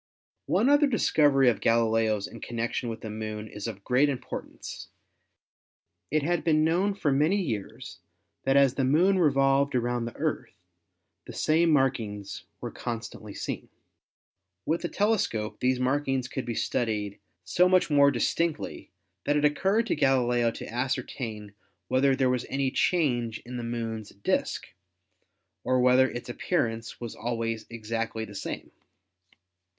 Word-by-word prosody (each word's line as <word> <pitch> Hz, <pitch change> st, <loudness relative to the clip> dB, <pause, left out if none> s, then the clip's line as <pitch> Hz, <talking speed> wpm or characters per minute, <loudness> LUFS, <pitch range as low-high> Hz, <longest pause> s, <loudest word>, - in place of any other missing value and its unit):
One 245 Hz, -, +2 dB
other 290 Hz, +1 st, +5 dB
discovery 145 Hz, -, +3 dB
of 120 Hz, -, +2 dB
Galileo's 115 Hz, -2 st, +2 dB
in -, -, -10 dB
connection 120 Hz, +1 st, -3 dB
with 115 Hz, 0 st, -6 dB
the 110 Hz, -, -6 dB
Moon 110 Hz, 0 st, -5 dB
is 105 Hz, +1 st, -6 dB
of 100 Hz, -3 st, -7 dB
great 130 Hz, +6 st, +3 dB
importance. 135 Hz, -3 st, -6 dB, 1.2 s
It 155 Hz, 0 st, +1 dB
had 175 Hz, +3 st, 0 dB
been 155 Hz, -2 st, +3 dB
known 180 Hz, +5 st, +2 dB
for 155 Hz, -7 st, 0 dB
many 155 Hz, +9 st, +3 dB
years 110 Hz, -, -5 dB, 0.4 s
that 135 Hz, +1 st, +3 dB
as 135 Hz, -2 st, +5 dB
the 135 Hz, -, -1 dB
Moon 175 Hz, +9 st, +4 dB
revolved 140 Hz, -2 st, +3 dB
around 120 Hz, -1 st, 0 dB
the 115 Hz, -, -7 dB
Earth -, -, -3 dB, 0.7 s
the -, -, -8 dB
same 165 Hz, +2 st, +2 dB
markings 110 Hz, -9 st, 0 dB, 0.2 s
were -, -, -4 dB
constantly 110 Hz, -3 st, -6 dB
seen. -, -, -5 dB, 1.0 s
With 165 Hz, +2 st, 0 dB
the 175 Hz, -, -3 dB
tele 210 Hz, +1 st, +2 dB
scope 105 Hz, -7 st, -2 dB
these 125 Hz, 0 st, +1 dB
markings 135 Hz, 0 st, 0 dB
could 130 Hz, -1 st, -4 dB
be 115 Hz, -, -2 dB
studied 105 Hz, -5 st, -1 dB, 0.2 s
so 175 Hz, -, +3 dB
much 185 Hz, -3 st, +3 dB
more 140 Hz, -1 st, +6 dB
dis 120 Hz, -4 st, 0 dB
tinctly 165 Hz, -2 st, -2 dB, 0.4 s
that 145 Hz, +1 st, +2 dB
it 150 Hz, -, +2 dB
occurred 195 Hz, +9 st, +2 dB
to -, -, 0 dB
Galileo 125 Hz, -3 st, +2 dB
to -, -, -7 dB
ascertain 120 Hz, -4 st, -3 dB, 0.4 s
whether 130 Hz, +1 st, +3 dB
there 130 Hz, -1 st, +2 dB
was 125 Hz, -1 st, 0 dB
any 135 Hz, -1 st, 0 dB
change 120 Hz, -10 st, +1 dB
in 125 Hz, +1 st, -6 dB
the 120 Hz, -, -4 dB
Moon's 115 Hz, -2 st, -4 dB
disk, 100 Hz, -, -1 dB, 1.0 s
or 130 Hz, 0 st, +2 dB
whether 125 Hz, +1 st, +5 dB
its 120 Hz, -, -7 dB
appearance 115 Hz, -1 st, -2 dB
was 120 Hz, -2 st, -6 dB
always 115 Hz, -1 st, -3 dB
exactly 115 Hz, 0 st, -3 dB
the 105 Hz, -, -12 dB
same. 100 Hz, -, -6 dB
125 Hz, 150 wpm, -27 LUFS, 115-145 Hz, 1.2 s, more